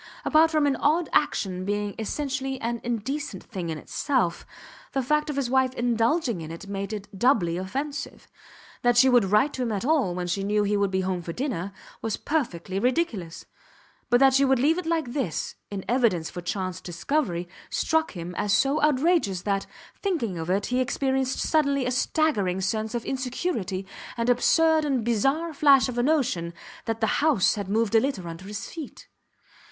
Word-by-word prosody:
Apart 315 +1 +5
from 310 -2 +2
any 280 -2 +1
odd 320 +3 +2
action 185 -10 +1
being 205 +1 -2
essentially 270 +3 -3
an 235 0 -3
indecent 240 - -3
thing 185 -6 -5
in 160 - -3
itself, 245 - -1 0.5
the 270 - 0
fact 300 +4 +1
of 295 - -2
his 275 -3 0
wife 260 0 +2
indulging 235 - +1
in 155 - -7
it 165 +4 -8
made 200 +1 -4
it 210 -1 -5
doubly 195 -6 +2
offensive. 275 - -5 0.5
That 245 0 +3
she 260 +2 +7
should 245 -4 +5
write 210 +9 +3
to 260 - -4
him 240 -2 -1
at 205 +2 -2
all, 275 - +2
when 180 0 -3
she 180 +3 -1
knew 210 +1 +1
he 205 0 +1
would 200 -1 +2
be 190 0 0
home 185 -1 -2
for 170 0 -6
dinner, 220 - -3 0.3
was 225 -2 -2
perfectly 195 - -2
ridiculous; 235 - -1 0.6
but 245 0 +5
that 270 -1 +6
she 270 - +4
should 265 -1 +4
leave 305 +8 +2
it 355 - -5
like 320 -7 -1
this 265 - -2 0.2
in 195 -2 -5
evidence 220 -9 +1
for 175 - -6
chance 185 +1 -3
discovery 175 - -2 0.2
struck 320 0 0
him 175 -1 -6
as 205 -1 +1
so 275 +7 +2
outrageous 295 - +2
that, 195 -1 -1 0.3
thinking 315 - -1
of 160 +1 -4
it, 195 +2 +1
he 250 +1 0
experienced 265 0 0
suddenly 280 -4 +2
a 250 - 0
staggering 250 - +1
sense 215 +4 -2
of 235 - -3
insecurity, 250 - -2 0.3
an 235 +1 +2
absurd 320 +6 +4
and 270 -5 0
bizarre 270 +9 +1
flash 280 -2 +5
of 245 -1 -3
a - - +4
notion 240 - 0 0.3
that 225 0 -3
the 220 - +1
house 290 -11 +4
had 200 -2 -5
moved 220 +1 +1
a 225 - +7
little 220 -8 -2
under 165 +2 -8
his 205 0 -6
feet. 320 -5 -9
240 Hz, 185 wpm, -26 LUFS, 195-280 Hz, 0.6 s, she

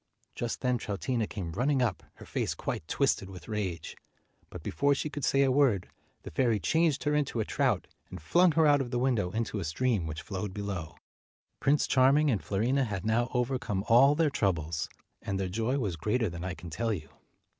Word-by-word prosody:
Just 120 -1 -4
then 125 -2 +1
Troutina 110 +3 -2
came 90 -5 -5
running 135 - +1
up, 125 -2 0
her - - -12
face - - -2
quite - - -4
twisted 95 - +1
with 95 -2 -11
rage; 95 -7 -3 0.5
but - - -9
before 140 0 +1
she 150 +2 -3
could 145 -2 -5
say 140 +2 +3
a 135 - +3
word, 130 -9 +2 0.3
the - - -8
fairy 120 -5 +2
changed 155 - +1
her 150 - +1
into 145 -5 0
a 110 - 0
trout, 125 -8 0 0.2
and 90 - -8
flung 170 - +4
her 160 0 +4
out 145 -2 +5
of 125 - -4
the 120 - -1
window 120 -7 +1
into 110 +1 -2
a - - -3
stream 95 +2 0
which 80 +1 -5
flowed 95 -1 -5
below. 100 -6 -4 0.6
Prince 145 +2 +3
Charming 140 +3 +4
and 105 - 0
Fiorina 125 +7 +1
had 100 -4 -4
now 115 +2 +1
over 125 +1 +1
come 100 -5 -2
all 135 +5 +6
their 160 -2 +2
troubles, 80 - -1 0.3
and 95 -1 -3
their 95 - -1
joy 115 +7 0
was 105 -10 -1
greater 110 +5 0
than 85 0 -7
I 95 -1 -3
can 85 -1 -10
tell 115 +8 -1
you. 80 -7 -4
115 Hz, 205 wpm, -29 LUFS, 95-135 Hz, 0.6 s, all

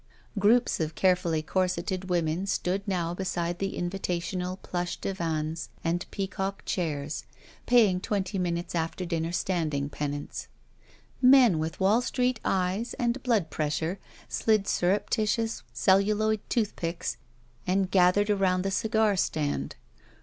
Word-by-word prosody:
Groups 230 +5 +3
of 160 -1 -2
carefully 175 -4 +2
corseted 185 +1 -1
women 170 +1 0
stood 190 0 0
now 175 -3 -1
beside 175 -2 -2
the 195 0 -2
invitational 180 0 -2
plush 175 -1 -3
divans 165 -3 -3
and 170 +1 -1
peacock 195 0 -3
chairs, 155 -4 -2 0.4
paying 220 -7 +5
twenty 200 -1 -1
minutes' 175 -1 -2
after 165 +2 -2
dinner 165 -1 -2
standing 155 -6 -1
penance. 145 0 -4 0.7
Men 250 -9 +7
with 160 +1 -3
Wall 200 +5 +4
j^treet 250 0 0
eyes 190 +5 0
and 240 +2 -1
blood 215 - +1
pressure 160 +5 -1 0.3
slid 215 -3 +2
surreptituous 215 - 0
celluloid 205 - +3
tooth 220 -4 0
picks 170 0 -3 0.5
and 190 0 +1
gathered 195 +3 +4
around 185 -2 +2
the 195 - -1
cigar 220 0 +2
stand. 155 -5 -1
185 Hz, 120 wpm, -28 LUFS, 170-205 Hz, 0.7 s, Men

